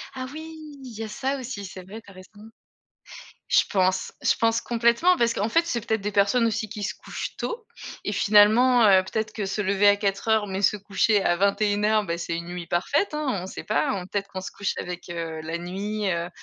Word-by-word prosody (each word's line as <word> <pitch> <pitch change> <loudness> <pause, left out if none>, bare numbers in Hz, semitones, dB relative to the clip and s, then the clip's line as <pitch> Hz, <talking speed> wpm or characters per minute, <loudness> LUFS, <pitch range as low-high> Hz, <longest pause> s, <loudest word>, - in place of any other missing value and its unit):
Ah 255 0 -4
oui! 320 +1 -8 0.3
il 230 -4 -9
y - - -3
a - - -5
ça 265 +6 -2
aussi. 230 -5 -6
C'est 185 -1 -9
vrai, 215 +5 -10
tu 200 - -16
as - - -15
raison. 205 +4 -14 1.0
Je - - +5
pense 185 -2 +1
je - - +3
pense 230 0 +2
complètement. 235 +10 +3
Parce 235 -1 +2
qu'en 210 +3 -1
fait, 335 +7 +2
c'est 235 -8 -2
peut-être 220 -2 0
des 205 +1 -3
personnes 205 +4 +3
aussi 220 -1 -2
qui 210 0 -7
se 205 - -2
couchent - - -7
tôt 465 -2 -5 0.4
et - - -2
finalement, 220 +4 +5
heu, 190 -2 +6
peut-être 215 +2 -3
que 210 - -4
se 205 +2 -3
lever 200 +1 +3
à 205 - +6
04:00, 205 +2 0
mais 190 +1 -4
se 210 - +3
coucher 205 +1 +1
à 175 - +2
21:00, 205 +2 +2
bah, 170 -2 -2
c'est 170 -1 -3
une 170 0 -6
nuit 175 -1 -6
parfaite, 285 - 0
hein. 300 -1 -2 0.2
On - - -6
sais - - -8
pas, 215 - +1 0.2
peut-être 200 -1 -2
qu'on 190 - -6
se 185 - -7
couche 200 - -1
avec, 180 0 -6
heu, 165 -2 -4
la 165 +2 -4
nuit, 200 +4 -3
heu 170 0 -2
205 Hz, 225 wpm, -25 LUFS, 190-230 Hz, 1.0 s, heu